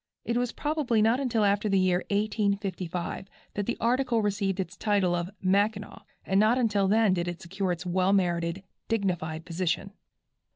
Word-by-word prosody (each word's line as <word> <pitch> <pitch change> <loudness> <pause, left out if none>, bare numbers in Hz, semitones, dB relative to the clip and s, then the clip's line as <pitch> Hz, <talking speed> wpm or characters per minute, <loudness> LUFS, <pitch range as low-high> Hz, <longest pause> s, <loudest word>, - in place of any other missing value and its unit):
It 235 - -1
was 245 -1 0
probably 295 -7 0
not 225 +4 +3
until 235 -6 +1
after 205 +1 +1
the 195 - +3
year 185 -1 +3
1855 200 -4 -1 0.3
that 205 -1 -3
the 240 - -1
article 240 -1 +1
received 200 -2 -1
its 185 +1 -3
title 200 -4 +1
of 175 0 -1
"Mackinaw," 200 +2 0 0.2
and 195 +1 +2
not 220 +4 +4
until 210 -5 +2
then 215 -1 +4
did 175 -1 -1
it 175 -1 -4
secure 190 +2 -3
its 175 +1 -4
well 185 +1 +1
merited, 175 -1 0 0.2
dignified 175 -7 -2
position. 180 +2 -2
200 Hz, 165 wpm, -28 LUFS, 180-220 Hz, 0.3 s, not